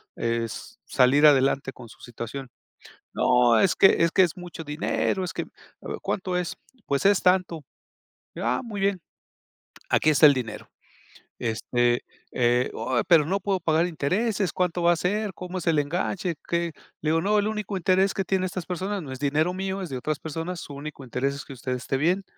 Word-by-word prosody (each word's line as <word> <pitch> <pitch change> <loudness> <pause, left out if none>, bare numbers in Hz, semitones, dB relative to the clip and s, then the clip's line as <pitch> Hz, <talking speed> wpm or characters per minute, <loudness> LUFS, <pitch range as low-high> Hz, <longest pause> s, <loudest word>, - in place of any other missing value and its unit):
eh, 115 0 -1
es 115 - -8
salir 135 +3 +4
adelante 135 -2 +4
con 120 -2 -12
su - - -16
situación?", 120 +2 -7 0.6
"No, 125 -2 +4
es 195 - +3
que 195 - +6
es 170 - +3
que 190 - +4
es 175 -3 +1
mucho 175 -2 -8
dinero, 155 +5 -1
es 175 - -4
que", - - -3 0.6
"¿Cuánto 185 -2 -2
es?", 180 -2 -3 0.3
"Pues 140 -1 0
es 200 -1 +3
tanto", 180 -4 +2 0.7
"Ah, 120 +2 0
muy 210 -4 -5
bien, 195 -2 +1 0.9
aquí 155 - +3
está 150 +1 +7
el 145 - +5
dinero", 120 -4 -5 0.7
este 120 +1 0 0.3
eh, 120 0 +2
"Oh, 130 -2 -1
pero 165 -4 +6
no 190 +5 0
puedo 195 0 -1
pagar 160 0 +2
intereses, 190 +4 0
¿cuánto 180 -1 0
va 170 0 +5
a - - 0
ser?, 205 +4 -1
¿cómo 180 0 -6
es 175 - -8
el 165 -2 +3
enganche?" 175 +4 -1
qué, 170 0 -1 0.3
le 155 - -1
digo: 165 0 +2
"No, 210 +4 +2
el 205 0 +2
único 210 -2 -3
interés 190 +2 +2
que 195 - 0
tienen 190 -1 0
estas 185 -1 -4
personas, 190 +2 -3
no 135 - -8
es 130 - -7
dinero 150 +5 +1
mío, 190 +1 -3
es 180 - -6
de 130 - -4
otras 150 +3 -3
personas, 165 +3 -5
su 145 - -9
único 145 0 -8
interés 130 +2 -2
es 140 - -7
que 140 - -9
usted 130 0 -4
esté 125 +1 -2
bien 175 +7 +1
165 Hz, 195 wpm, -25 LUFS, 135-185 Hz, 0.9 s, está